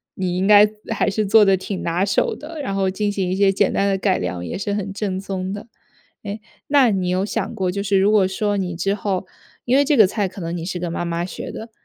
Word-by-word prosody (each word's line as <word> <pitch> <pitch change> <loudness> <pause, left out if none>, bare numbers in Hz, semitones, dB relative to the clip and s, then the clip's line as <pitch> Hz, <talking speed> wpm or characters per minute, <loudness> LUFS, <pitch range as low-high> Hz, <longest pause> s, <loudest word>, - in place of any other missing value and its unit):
你 180 -2 -2
应 190 +1 +1
该 210 0 +8 0.3
还 - - +1
是 210 +2 -1
做 210 +2 +6
得 195 -1 +5
挺 190 0 -5
拿 170 +2 0
手 200 0 +1
的， 315 +1 -9
然 230 -8 -3
后 195 -1 +1
进 205 +2 -1
行 195 -3 -2
一 185 - 0
些 195 0 +4
简 195 - +1
单 200 - +1
的 195 - +1
改 190 - +1
良 90 -1 -4
也 - - -4
是 200 +1 -3
很 200 -1 -3
正 195 -2 -3
宗 190 -1 -4
的。 205 +2 -8 0.6
诶， 205 +1 -5 0.3
那 275 -4 +4
你 190 -3 -1
有 185 +2 0
想 210 - -3
过， 185 -1 -1
就 200 +2 -3
是 200 -1 +2
如 195 +2 +3
果 205 -3 +4
说 205 +2 -1
你 185 -3 -2
之 195 +4 0
后 195 -2 -2 0.4
因 250 +2 +2
为 285 - +4
这 285 +1 +2
个 215 -5 +7
菜 205 +1 -1
可 190 +2 -11
能 170 0 -4
你 165 - -5
是 180 0 -4
跟 175 -1 -4
妈 175 - -2
妈 170 0 -2
学 180 - -7
的， 225 +1 -8
195 Hz, 285 characters per minute, -21 LUFS, 185-205 Hz, 0.6 s, 该